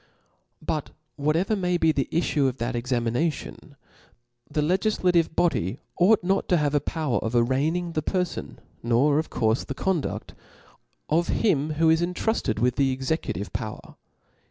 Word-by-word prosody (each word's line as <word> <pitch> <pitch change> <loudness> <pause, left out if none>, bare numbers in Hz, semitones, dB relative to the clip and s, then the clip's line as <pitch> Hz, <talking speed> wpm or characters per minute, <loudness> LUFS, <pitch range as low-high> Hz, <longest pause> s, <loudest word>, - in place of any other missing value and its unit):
But 155 -3 -2 0.3
whatever 160 +8 +1
may 180 -3 0
be 160 -2 +3
the 140 -3 -1
iflfue 150 -4 +1
of 130 - -7
that 120 +2 -2
exami 120 -1 -1
nation, 150 +1 -3 0.7
the 150 0 0
legiflative 180 -1 +1
body 120 - +1 0.2
ought 195 +3 +5
not 190 +2 0
to 180 - +4
have 150 -2 0
a 145 - +4
power 150 -2 -1
of 110 +2 -3
arranging 145 +9 +1
the 155 - -1
perfon, 180 +2 -2 0.3
nor 130 +6 +3
of 160 - -3
courfe 110 +1 0
the 135 - -4
condudi: 185 -3 -2 0.8
of 170 +3 +2
him 155 -7 +1
who 160 +1 +3
is 160 +1 +3
intruded 180 - -1
with 125 +2 +1
the 135 -2 +2
executive^ 130 - -3
power. 110 0 -6
155 Hz, 155 wpm, -25 LUFS, 130-175 Hz, 0.8 s, ought